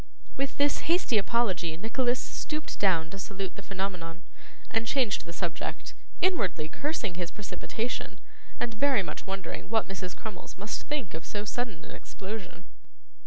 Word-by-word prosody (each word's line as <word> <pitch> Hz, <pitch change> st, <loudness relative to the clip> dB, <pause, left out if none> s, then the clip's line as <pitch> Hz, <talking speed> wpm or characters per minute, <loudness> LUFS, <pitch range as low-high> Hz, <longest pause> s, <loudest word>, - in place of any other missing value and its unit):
With 275 Hz, -1 st, 0 dB
this 285 Hz, 0 st, +5 dB
hasty 335 Hz, -, +5 dB
apology 190 Hz, -7 st, +2 dB
Nicholas 245 Hz, +5 st, +2 dB
stooped 305 Hz, 0 st, -3 dB
down 170 Hz, -5 st, +4 dB
to 195 Hz, -, -5 dB
salute 195 Hz, 0 st, -3 dB
the -, -, -6 dB
Phenomenon, 185 Hz, -4 st, -3 dB, 0.5 s
and 225 Hz, 0 st, +2 dB
changed 240 Hz, -8 st, +3 dB
the 170 Hz, -, -5 dB
subject; 170 Hz, -1 st, -2 dB, 0.3 s
inwardly 195 Hz, -, +3 dB
cursing 275 Hz, -, -1 dB
his 175 Hz, -1 st, -1 dB
precipitation, 220 Hz, +3 st, -3 dB, 0.4 s
and 235 Hz, -1 st, 0 dB
very 255 Hz, -1 st, +4 dB
much -, -, -5 dB
wondering 190 Hz, -1 st, -3 dB
what 225 Hz, 0 st, +4 dB
Mrs. 190 Hz, -1 st, -4 dB
Crummles 215 Hz, -4 st, -7 dB
must 205 Hz, +3 st, -3 dB
think 285 Hz, -, -1 dB
of 160 Hz, +1 st, -4 dB
so 205 Hz, +2 st, -2 dB
sudden 225 Hz, -5 st, -1 dB
an -, -, -9 dB
explosion. 195 Hz, -2 st, -6 dB
200 Hz, 150 wpm, -31 LUFS, 185-240 Hz, 0.5 s, this